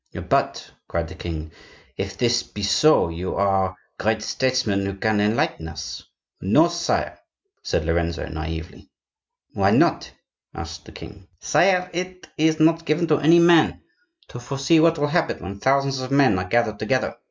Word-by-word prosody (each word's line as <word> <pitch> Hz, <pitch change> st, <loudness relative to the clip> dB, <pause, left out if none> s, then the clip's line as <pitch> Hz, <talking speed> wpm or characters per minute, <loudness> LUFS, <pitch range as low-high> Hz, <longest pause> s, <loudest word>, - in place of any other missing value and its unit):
"But," -, -, 0 dB, 0.2 s
cried 85 Hz, -1 st, -3 dB
the -, -, -9 dB
king, 80 Hz, -3 st, -6 dB, 0.4 s
"if 95 Hz, 0 st, -5 dB
this 120 Hz, -1 st, +2 dB
be 105 Hz, -3 st, -8 dB
so, 130 Hz, -, +4 dB
you 85 Hz, +3 st, -4 dB
are 95 Hz, -1 st, +1 dB, 0.2 s
great 110 Hz, 0 st, 0 dB
statesmen 125 Hz, -4 st, 0 dB
who 100 Hz, 0 st, -3 dB
can 105 Hz, +1 st, 0 dB
enlighten 105 Hz, -6 st, 0 dB
us." 80 Hz, -, -7 dB, 0.4 s
"No, 150 Hz, -, +4 dB
sire," 170 Hz, -, -2 dB, 0.4 s
said 80 Hz, -, -2 dB
Lorenzo, 85 Hz, 0 st, -1 dB
naively. 80 Hz, +2 st, -7 dB, 0.6 s
"Why -, -, +2 dB
not?" -, -, +2 dB, 0.4 s
asked -, -, -8 dB
the -, -, -13 dB
king. -, -, -12 dB
"Sire, 180 Hz, -2 st, +2 dB
it 180 Hz, +1 st, -5 dB
is 155 Hz, 0 st, +1 dB
not 165 Hz, +1 st, +3 dB
given 155 Hz, +2 st, +1 dB
to 150 Hz, -, +3 dB
any 160 Hz, +3 st, +5 dB
man 170 Hz, -2 st, +4 dB, 0.5 s
to 120 Hz, -, -8 dB
foresee 140 Hz, +6 st, +1 dB
what 165 Hz, +1 st, +4 dB
will 145 Hz, -, +1 dB
happen 160 Hz, +3 st, 0 dB
when 100 Hz, +2 st, -7 dB
thousands 135 Hz, +1 st, +1 dB
of 130 Hz, -, -5 dB
men 135 Hz, -9 st, +3 dB
are 90 Hz, 0 st, -5 dB
gathered 115 Hz, -2 st, +1 dB
together. -, -, -1 dB
120 Hz, 160 wpm, -22 LUFS, 95-155 Hz, 0.6 s, any